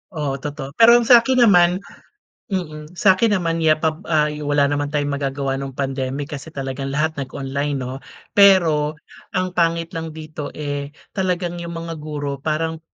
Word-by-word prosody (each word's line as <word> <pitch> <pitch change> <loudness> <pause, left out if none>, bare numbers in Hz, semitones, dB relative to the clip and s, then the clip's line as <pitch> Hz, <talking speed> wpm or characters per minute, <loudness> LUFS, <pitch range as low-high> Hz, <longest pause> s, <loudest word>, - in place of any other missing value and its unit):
Oo, 140 -3 -3
totoo. 145 -2 -6
Pero 230 +5 +7
ang 235 - 0
sa'kin 245 +1 +6
naman 175 -3 +5 0.7
mm, 155 -4 -5
sa'kin 205 +3 +4
naman, 165 -2 -1
yeah, 155 -1 +4
pa, 160 +1 0 0.2
ah, 150 -2 +2
wala 145 -1 +1
naman 145 0 0
tayong 145 -1 -1
magagawa 135 -1 -2
nung 135 -1 -6
pandemic 135 +2 -3
kasi 145 +2 -7
talagang 135 -2 -5
lahat 155 0 0
nag-online, 140 +1 -3
'no? 130 0 -4 0.3
Pero 165 -7 +5 0.4
ang 185 0 0
pangit 170 -1 0
lang 160 -1 -6
dito, 155 -2 -7
eh, 145 0 -4 0.2
talagang 180 -2 -2
'yong 170 0 -6
mga 165 0 -5
guro 145 -2 -4
parang 160 +2 -2
155 Hz, 160 wpm, -21 LUFS, 140-170 Hz, 0.7 s, Pero